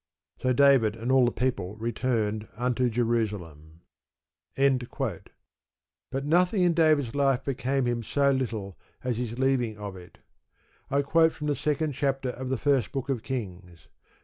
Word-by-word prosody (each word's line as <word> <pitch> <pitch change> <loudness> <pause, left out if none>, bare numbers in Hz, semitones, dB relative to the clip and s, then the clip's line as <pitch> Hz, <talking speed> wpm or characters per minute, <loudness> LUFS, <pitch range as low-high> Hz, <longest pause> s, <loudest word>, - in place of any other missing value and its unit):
So 130 - +1
David 125 -5 +4
and 115 +3 -3
all 130 -1 +5
the 120 - +1
people 105 -7 -2
returned 110 -2 -1
unto 125 +1 +1
Jerusalem. 105 -10 -2 0.8
But 135 -3 0 1.0
nothing 180 +5 +3
in 175 -1 +4
David's 155 -7 +3
life 135 -3 +2
became 135 0 -1
him 120 -1 0
so 140 +5 +2
little 110 -8 -3 0.2
as 125 -3 -1
his 120 -1 -4
leaving 130 -5 +1
of 100 -2 -6
it. 90 -1 -13 0.7
I 140 +1 +1
quote 160 +3 +3
from 150 - -7
the 145 -1 +1
second 150 +1 -1
chapter 135 -1 -1
of 125 +1 -5
the 130 - 0
First 135 -2 +1
Book 135 0 -4
of 130 -5 -1
Kings. 90 -8 -7
125 Hz, 150 wpm, -27 LUFS, 110-140 Hz, 1.0 s, all